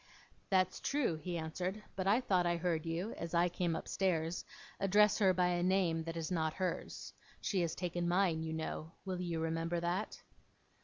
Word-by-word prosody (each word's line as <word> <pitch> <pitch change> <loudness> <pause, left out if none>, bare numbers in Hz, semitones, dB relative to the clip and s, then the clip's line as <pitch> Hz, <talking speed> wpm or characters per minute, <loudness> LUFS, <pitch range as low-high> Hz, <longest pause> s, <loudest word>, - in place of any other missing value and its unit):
'That's 185 -1 +2
true,' 275 - 0
he 175 +2 -4
answered. 180 +6 -3
'But 190 0 -1
I 215 +6 +4
thought 185 -7 +2
I 170 0 +2
heard 165 -2 -1
you, 170 +7 -2
as 170 0 -4
I 175 +1 +4
came 175 -1 -1
upstairs, 170 -3 0 0.4
address 205 +1 +4
her 195 -3 +6
by 180 -1 +2
a 175 0 +1
name 175 -3 +2
that 165 0 -4
is 165 +1 -3
not 160 -3 0
hers. 185 -1 -3 0.3
She 190 -3 0
has 170 -2 -1
taken 175 -1 -2
mine, 175 -2 +2
you 160 0 -3
know. 160 0 -4
Will 185 -2 -2
you 170 -2 -2
remember 165 +1 -1
that? 175 +5 -2
175 Hz, 185 wpm, -35 LUFS, 165-185 Hz, 0.4 s, her